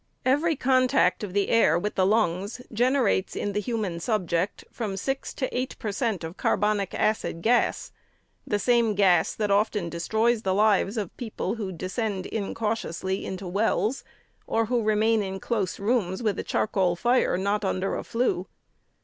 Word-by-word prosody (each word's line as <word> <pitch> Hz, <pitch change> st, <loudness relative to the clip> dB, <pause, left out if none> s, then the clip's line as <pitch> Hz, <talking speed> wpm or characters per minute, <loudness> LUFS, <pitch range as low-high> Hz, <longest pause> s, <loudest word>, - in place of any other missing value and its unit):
Every 300 Hz, +5 st, +2 dB
contact 255 Hz, -4 st, +2 dB
of 195 Hz, -3 st, -5 dB
the 200 Hz, 0 st, +1 dB
air 225 Hz, -8 st, +4 dB
with 210 Hz, +4 st, -2 dB
the 185 Hz, -1 st, +2 dB
lungs 200 Hz, 0 st, 0 dB
generates 245 Hz, -4 st, +1 dB
in 205 Hz, -, -2 dB
the 210 Hz, -, 0 dB
human 210 Hz, -6 st, -2 dB
subject 180 Hz, -2 st, -1 dB
from 210 Hz, -5 st, -4 dB
six 270 Hz, +7 st, -3 dB
to 260 Hz, -, -1 dB
eight 255 Hz, +1 st, -2 dB
per 215 Hz, -, -3 dB
cent 215 Hz, -4 st, -1 dB
of 165 Hz, +3 st, -7 dB
carbonic 205 Hz, -1 st, 0 dB
acid 215 Hz, -6 st, -1 dB
gas 240 Hz, +2 st, +1 dB, 0.3 s
— -, -, -42 dB
the 210 Hz, -, +1 dB
same 235 Hz, -1 st, +2 dB
gas 185 Hz, -5 st, +3 dB
that 210 Hz, -2 st, -1 dB
often 205 Hz, -3 st, +1 dB
destroys 220 Hz, +7 st, +1 dB
the 190 Hz, -3 st, 0 dB
lives 210 Hz, +1 st, +3 dB
of 205 Hz, -5 st, -4 dB
people 230 Hz, -4 st, -3 dB
who 210 Hz, -5 st, -4 dB
descend 190 Hz, +2 st, -3 dB
incautiously 200 Hz, -3 st, -3 dB
into 190 Hz, +1 st, -5 dB
wells, 210 Hz, +5 st, 0 dB, 0.4 s
or 225 Hz, 0 st, +1 dB
who 240 Hz, +1 st, 0 dB
remain 215 Hz, +1 st, +2 dB
in 190 Hz, -1 st, -4 dB
close 200 Hz, -4 st, -2 dB
rooms, 200 Hz, -2 st, 0 dB
with 210 Hz, -3 st, 0 dB
a -, -, -2 dB
charcoal 185 Hz, -4 st, +1 dB
fire 240 Hz, +1 st, +2 dB
not 200 Hz, +3 st, 0 dB
under 190 Hz, 0 st, -1 dB
a -, -, -4 dB
flue. 230 Hz, -6 st, -1 dB
210 Hz, 165 wpm, -26 LUFS, 190-230 Hz, 0.4 s, air